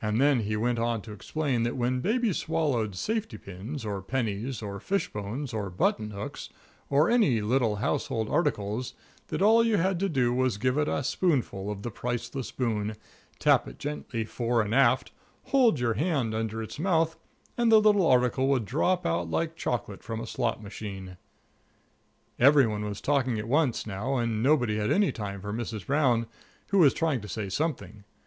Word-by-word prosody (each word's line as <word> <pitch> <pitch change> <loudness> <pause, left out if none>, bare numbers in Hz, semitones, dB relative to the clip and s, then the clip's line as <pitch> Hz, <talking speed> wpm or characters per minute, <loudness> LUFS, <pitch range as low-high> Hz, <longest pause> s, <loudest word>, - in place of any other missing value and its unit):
Then 125 +6 +3
he 105 -1 -1
went 120 +2 0
on 115 -2 -1
to 110 - -9
explain 125 +4 -2
that 120 +2 -1
when 125 +1 0
baby 220 - +1
swallowed 145 - -1
safety 220 - -2
pins, 105 +8 -7
or 100 -2 -3
pennies, 115 +2 -3
or 100 -1 -5
fish 195 - -2
bones, 115 +6 -4
or 105 -3 -2
button 105 +4 0
hooks, 100 -1 -7 0.4
or 145 +4 +4
any 210 - +4
little 115 0 +1
household 110 +1 -1
articles, 105 +6 -1 0.3
that - - -1
all 225 +2 +6
you 225 -2 +2
had 185 0 +1
to 195 +1 0
do 125 -6 +1
was 130 -2 +1
to - - -10
give 130 +5 +1
it 150 - +1
a - - -1
spoonful 125 - 0
of 100 -1 -5
the 120 - -4
Priceless 120 +4 -4
Boon, 110 -4 -2 0.4
tap - - +3
it - - -10
gently 140 -6 -4
fore 120 0 0
and 105 +1 -3
aft, 130 -1 +3 0.3
hold 245 - +3
your 120 -2 +1
hand 140 -7 0
under 110 0 -2
its 110 - -8
mouth, 165 -2 +2 0.4
and 235 -1 +2
the 220 - +8
little 205 -4 +4
article 125 0 +3
would 135 -5 +1
drop 175 - 0
out 85 0 0
like 165 - -1
chocolate 105 -9 -3
from 115 0 -5
a 115 - -5
slot 115 -2 -2
machine. 95 -3 -7 1.2
Every 140 +1 +7
one 105 -2 -2
was 105 -1 -5
talking 130 -5 +1
at 110 +1 -4
once, 140 -1 +1
now, 110 +6 -2
and 115 -2 -1
nobody 125 -5 +2
had 105 0 0
any 205 -2 +3
time 100 -3 -6
for 105 +1 -5
Mrs. 110 -3 -4
Brown, 130 -5 +2 0.4
who 200 - +3
was 150 -6 +6
trying 155 -7 0
to 105 - -8
say 100 +2 -4
something. 105 - -3
120 Hz, 185 wpm, -28 LUFS, 105-150 Hz, 1.2 s, the